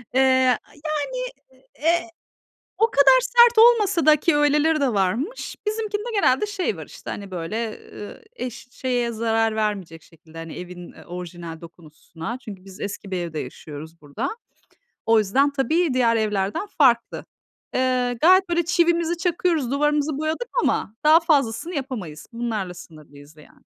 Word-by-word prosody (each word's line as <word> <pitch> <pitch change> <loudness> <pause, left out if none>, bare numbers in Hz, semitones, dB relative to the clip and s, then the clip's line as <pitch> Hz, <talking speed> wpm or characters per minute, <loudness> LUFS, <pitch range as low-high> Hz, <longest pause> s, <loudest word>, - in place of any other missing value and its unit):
Eee, 260 - +5 0.6
yani, 310 +10 -2 0.6
eee, 340 +2 +1 0.7
o 450 +1 +3
kadar 450 - +6
sert 480 -2 +5
olmasa 420 - +5
da 305 -1 +7
ki 300 +1 +1
öyleleri 295 +2 +3
de 270 -3 +1
varmış, 225 - -1
bizimkinde 425 0 -2
genelde 395 -4 +3
şey 380 - -2
var 160 -2 -8
işte, - - -10
hani 200 -1 -7
böyle, 215 +6 -4
ııı, 205 - -10
eş 250 - -7
şeye 245 -2 -1
zarar 225 0 0
vermeyecek 195 -7 -3
şekilde, 165 0 -16
hani 165 -1 -8
evin, 180 -1 -9
eee, - - -15
orijinal 175 -2 -8
dokusuna. 165 +5 -9
Çünkü 205 -7 -10
biz 195 +1 -13
eski 200 0 -6
bir 185 - -2
evde 170 -3 -4
yaşıyoruz 150 +4 -9
burada. 150 - -4 0.8
O 225 -1 +5
yüzden 260 +8 +2
tabii 310 +3 +1
diğer 240 -2 +3
evlerden 210 - -1
farklı. 255 - +2 0.5
Eee, 250 -1 0
gayet 370 +2 +5
böyle 345 -1 +1
çivimizi 340 0 +2
çakıyoruz, 335 -5 0
duvarımızı 295 +1 +1
boyadık 315 +10 -3
ama 215 - -1
daha 310 +2 +8
fazlasını 305 -1 0
yapamayız. 225 - -6
Bunlarla 220 -6 -3
sınırlıyız 155 -3 -14
yani. 150 - -19
245 Hz, 145 wpm, -23 LUFS, -, 0.8 s, daha